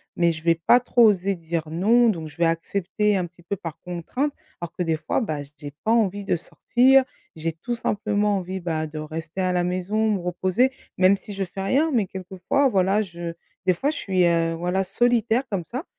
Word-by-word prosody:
mais 170 Hz, -1 st, +3 dB
je 160 Hz, -1 st, -7 dB
vais 165 Hz, 0 st, +4 dB
pas 165 Hz, +9 st, +4 dB
trop 245 Hz, -1 st, +3 dB
oser 195 Hz, -2 st, +3 dB
dire 165 Hz, -1 st, -4 dB
non 225 Hz, +8 st, +4 dB
donc 165 Hz, -7 st, -2 dB
je 150 Hz, +2 st, -14 dB
vais 170 Hz, -, +3 dB
accepter 195 Hz, +5 st, 0 dB
un 180 Hz, -, -1 dB
petit 175 Hz, 0 st, -22 dB
peu 200 Hz, +4 st, -3 dB
par 165 Hz, -3 st, -7 dB
contrainte. 180 Hz, -, -3 dB, 0.3 s
Alors 170 Hz, -1 st, -5 dB
que -, -, -5 dB
des 165 Hz, -2 st, +1 dB
fois, 155 Hz, -, -1 dB
bah, 155 Hz, -9 st, -3 dB, 0.2 s
j'ai 145 Hz, -, -6 dB
pas 220 Hz, -, +1 dB
envie 205 Hz, -3 st, +1 dB
de -, -, +1 dB
sortir, 260 Hz, +9 st, +3 dB, 0.3 s
j'ai 165 Hz, +1 st, -2 dB
tout 240 Hz, +9 st, -4 dB
simplement 210 Hz, -2 st, 0 dB
envie, 190 Hz, 0 st, -4 dB
bah, 160 Hz, -2 st, -2 dB
de 155 Hz, 0 st, -9 dB
rester 160 Hz, +3 st, -5 dB
à 185 Hz, -, +1 dB
la 180 Hz, -1 st, +1 dB
maison, 190 Hz, +5 st, 0 dB
me 195 Hz, -, -1 dB
reposer 185 Hz, +8 st, +1 dB, 0.3 s
même 190 Hz, +2 st, +5 dB
si 205 Hz, -, -9 dB
je 195 Hz, 0 st, -2 dB
fais 195 Hz, +1 st, -6 dB
rien, 285 Hz, +11 st, +2 dB
mais 220 Hz, -7 st, +1 dB
quelquefois 190 Hz, +9 st, -1 dB
voilà, 195 Hz, -1 st, +2 dB
je 170 Hz, -3 st, -7 dB, 0.3 s
des 185 Hz, -, +5 dB
fois 280 Hz, -, 0 dB
je 310 Hz, -, -6 dB
suis, 185 Hz, -2 st, +1 dB
heu, 165 Hz, -1 st, +2 dB
voilà 180 Hz, +3 st, 0 dB
solitaire 240 Hz, +3 st, +2 dB
comme 185 Hz, -4 st, -2 dB
ça 255 Hz, +6 st, -4 dB
185 Hz, 215 wpm, -24 LUFS, 170-215 Hz, 0.3 s, même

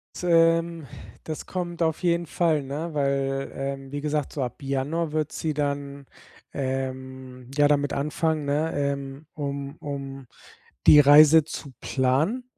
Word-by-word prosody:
S -, -, -8 dB
ähm. 165 Hz, -2 st, +3 dB, 0.4 s
Das 155 Hz, -1 st, -6 dB
kommt 175 Hz, -2 st, -3 dB
auf 160 Hz, +2 st, -1 dB
jeden 170 Hz, -1 st, +1 dB
Fall, 160 Hz, -2 st, +1 dB
ne, 150 Hz, +5 st, -5 dB
weil, 135 Hz, -1 st, -1 dB
ähm, 135 Hz, 0 st, -5 dB
wie 145 Hz, -, -3 dB
gesagt, 150 Hz, -1 st, -2 dB
so 145 Hz, -, -4 dB
ab 125 Hz, +3 st, -6 dB
Januar 145 Hz, +4 st, -2 dB
wird 155 Hz, -1 st, -2 dB
sie 155 Hz, -1 st, -2 dB
dann, 140 Hz, -1 st, -3 dB, 0.5 s
ähm, 130 Hz, -1 st, -5 dB
ja 145 Hz, +1 st, +4 dB
damit 145 Hz, -1 st, +1 dB
anfangen, 150 Hz, +1 st, -1 dB
ne, 150 Hz, +3 st, 0 dB
ähm, 140 Hz, 0 st, -3 dB
um 140 Hz, -1 st, -5 dB
um 135 Hz, -2 st, -7 dB, 0.6 s
die 150 Hz, -, +9 dB
Reise 150 Hz, +2 st, +8 dB
zu 145 Hz, -2 st, -8 dB
planen. 140 Hz, -, 0 dB
145 Hz, 145 wpm, -25 LUFS, 135-160 Hz, 0.6 s, die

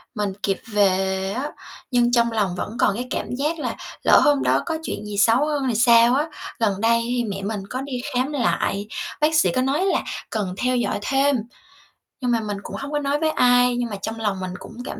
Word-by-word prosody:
mình 205 Hz, -3 st, -1 dB
kịp 195 Hz, -2 st, +1 dB, 0.2 s
về 190 Hz, -1 st, +1 dB
á, 265 Hz, +8 st, -3 dB, 0.4 s
nhưng 240 Hz, -1 st, +3 dB
trong 235 Hz, -1 st, +3 dB
lòng 205 Hz, -5 st, 0 dB
vẫn 215 Hz, +6 st, -5 dB
còn 200 Hz, -, +3 dB
cái 245 Hz, +3 st, -4 dB
cảm -, -, -3 dB
giác 300 Hz, +5 st, -1 dB
là -, -, -3 dB, 0.3 s
"Lỡ -, -, +7 dB
hôm 290 Hz, -2 st, +3 dB
đó -, -, +2 dB
có 320 Hz, -2 st, -2 dB
chuyện 215 Hz, -, -5 dB
gì 210 Hz, -1 st, -5 dB
xấu 230 Hz, +7 st, +4 dB
hơn 295 Hz, -2 st, -1 dB
thì 235 Hz, -, 0 dB
sao?" 235 Hz, +1 st, +6 dB
á. 295 Hz, +3 st, +1 dB, 0.3 s
Gần 205 Hz, -4 st, 0 dB
đây 230 Hz, +1 st, +3 dB
thì 245 Hz, 0 st, 0 dB
mẹ 195 Hz, -2 st, -4 dB
mình 205 Hz, 0 st, -3 dB
có 255 Hz, -, -3 dB
đi 265 Hz, -3 st, -4 dB
khám 255 Hz, +3 st, 0 dB
lại, 210 Hz, -6 st, 0 dB, 0.3 s
bác 310 Hz, +1 st, +3 dB
sĩ 310 Hz, -, +4 dB
có 255 Hz, -, +2 dB
nói 280 Hz, +8 st, +1 dB
là 390 Hz, -, +2 dB, 0.3 s
cần 205 Hz, -5 st, -2 dB
theo 250 Hz, +2 st, +1 dB
dõi 240 Hz, -, -1 dB
thêm. 275 Hz, +5 st, +2 dB, 0.9 s
Nhưng 250 Hz, -1 st, 0 dB
mà 235 Hz, -, +2 dB
mình 205 Hz, -2 st, -4 dB
cũng -, -, -7 dB
hông 280 Hz, +1 st, -6 dB
có 295 Hz, -, 0 dB
nói 285 Hz, 0 st, 0 dB
với 315 Hz, 0 st, +1 dB
ai, 245 Hz, -2 st, +4 dB
nhưng 240 Hz, -1 st, -1 dB
mà 205 Hz, -, -4 dB
trong 225 Hz, +2 st, -4 dB
lòng 205 Hz, -3 st, -1 dB
mình 185 Hz, -1 st, -4 dB
cũng -, -, -11 dB
cảm -, -, -6 dB
240 Hz, 230 wpm, -22 LUFS, 210-275 Hz, 0.9 s, Lỡ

